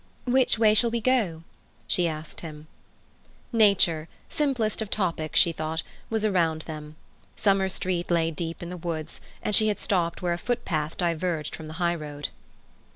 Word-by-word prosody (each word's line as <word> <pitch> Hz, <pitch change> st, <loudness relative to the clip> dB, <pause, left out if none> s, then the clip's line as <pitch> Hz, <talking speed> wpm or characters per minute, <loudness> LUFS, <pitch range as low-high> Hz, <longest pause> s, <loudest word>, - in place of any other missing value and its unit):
"Which 250 Hz, -1 st, +4 dB
way 220 Hz, -1 st, +5 dB
shall 230 Hz, +2 st, +5 dB
we 235 Hz, 0 st, -1 dB
go?" 215 Hz, -10 st, +1 dB, 0.4 s
she 175 Hz, -1 st, +3 dB
asked 155 Hz, -1 st, -6 dB
him. 155 Hz, -2 st, -8 dB, 0.9 s
Nature—simplest 215 Hz, -, +2 dB
of 215 Hz, -, -3 dB
topics, 170 Hz, -7 st, +1 dB
she 170 Hz, -, +5 dB
thought—was 160 Hz, +7 st, -3 dB
around 165 Hz, -6 st, +1 dB
them. 155 Hz, -1 st, -8 dB, 0.4 s
Summer 195 Hz, -2 st, +2 dB
Street 180 Hz, -2 st, -1 dB
lay 165 Hz, -1 st, +2 dB
deep 165 Hz, +1 st, -5 dB
in 175 Hz, -, -6 dB
the 180 Hz, -, -5 dB
woods, 160 Hz, -2 st, -5 dB, 0.2 s
and 210 Hz, -, -1 dB
she 215 Hz, -, +5 dB
had 210 Hz, -, 0 dB
stopped 175 Hz, -3 st, 0 dB
where 175 Hz, -1 st, +1 dB
a 170 Hz, -, -4 dB
footpath 175 Hz, -10 st, -2 dB
diverged 170 Hz, -3 st, -1 dB
from 160 Hz, -, -9 dB
the 155 Hz, -, -7 dB
highroad. 155 Hz, -5 st, -2 dB
175 Hz, 155 wpm, -26 LUFS, 160-210 Hz, 0.9 s, way